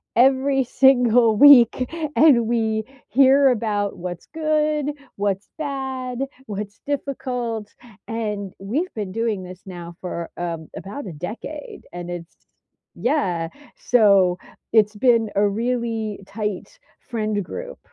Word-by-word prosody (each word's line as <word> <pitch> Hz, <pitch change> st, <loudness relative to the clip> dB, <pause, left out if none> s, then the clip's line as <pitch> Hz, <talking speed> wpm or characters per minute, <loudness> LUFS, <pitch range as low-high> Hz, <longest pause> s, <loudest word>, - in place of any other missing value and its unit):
every 265 Hz, +2 st, +4 dB
single 245 Hz, -3 st, +4 dB
week 255 Hz, -3 st, +7 dB, 0.2 s
and 255 Hz, -8 st, +5 dB
we 220 Hz, -2 st, 0 dB, 0.3 s
hear 275 Hz, +1 st, +5 dB
about 210 Hz, -4 st, -1 dB
what's 175 Hz, -1 st, -6 dB
good, 305 Hz, -2 st, +1 dB, 0.2 s
what's 200 Hz, -1 st, -1 dB
bad, 265 Hz, -4 st, -4 dB, 0.3 s
what's 205 Hz, 0 st, -6 dB
difficult, 250 Hz, -6 st, -3 dB, 0.4 s
and 210 Hz, -4 st, -3 dB
we've 275 Hz, -, -2 dB
been 205 Hz, -4 st, -4 dB
doing 220 Hz, -3 st, -1 dB
this 180 Hz, +1 st, -10 dB
now 175 Hz, -2 st, -8 dB
for, 170 Hz, -2 st, -5 dB
um, 165 Hz, -2 st, -4 dB
about 210 Hz, +5 st, -7 dB
a 180 Hz, -, -6 dB
decade, 220 Hz, -, -7 dB
and 175 Hz, 0 st, -6 dB
it's 170 Hz, -1 st, -8 dB, 0.6 s
yeah, 185 Hz, -, 0 dB, 0.3 s
so 200 Hz, -6 st, +4 dB, 0.4 s
it's 215 Hz, -1 st, +4 dB
been 230 Hz, -1 st, +3 dB
a 205 Hz, +1 st, +4 dB
really 225 Hz, -1 st, -2 dB
tight 210 Hz, -, -5 dB, 0.2 s
friend 215 Hz, -3 st, -2 dB
group. -, -, -7 dB
225 Hz, 115 wpm, -22 LUFS, 200-265 Hz, 0.6 s, week